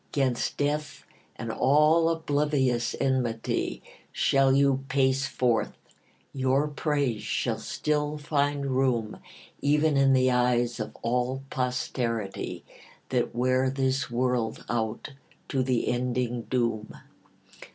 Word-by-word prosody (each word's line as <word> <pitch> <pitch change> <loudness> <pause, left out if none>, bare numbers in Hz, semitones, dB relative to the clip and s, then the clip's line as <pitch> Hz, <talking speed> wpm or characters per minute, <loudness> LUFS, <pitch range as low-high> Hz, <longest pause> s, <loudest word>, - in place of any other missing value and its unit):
'Gainst 130 -4 0
death 150 +1 -2 0.3
and 115 0 -5
all 150 +6 +4
oblivious 145 -6 0
enmity 125 -4 -1 0.3
Shall 135 -1 +3
you 135 0 +3
pace 135 0 +2
forth; 120 -4 0 0.6
your 135 +2 +1
praise 145 -6 -1
shall - - -1
still 150 0 -1
find 145 -1 0
room 130 -5 0 0.4
Even 150 +1 +2
in 135 0 +5
the 130 -1 +4
eyes 120 -1 +1
of 110 - -5
all 125 +3 -1
posterity 125 -4 -3 0.4
That - - -1
wear 130 +2 +2
this 135 0 0
world 120 -2 -1
out 115 +3 -2 0.4
to 135 - 0
the 125 -2 0
ending 125 -1 -1
doom. 115 -4 -1
130 Hz, 110 wpm, -27 LUFS, 120-140 Hz, 0.6 s, in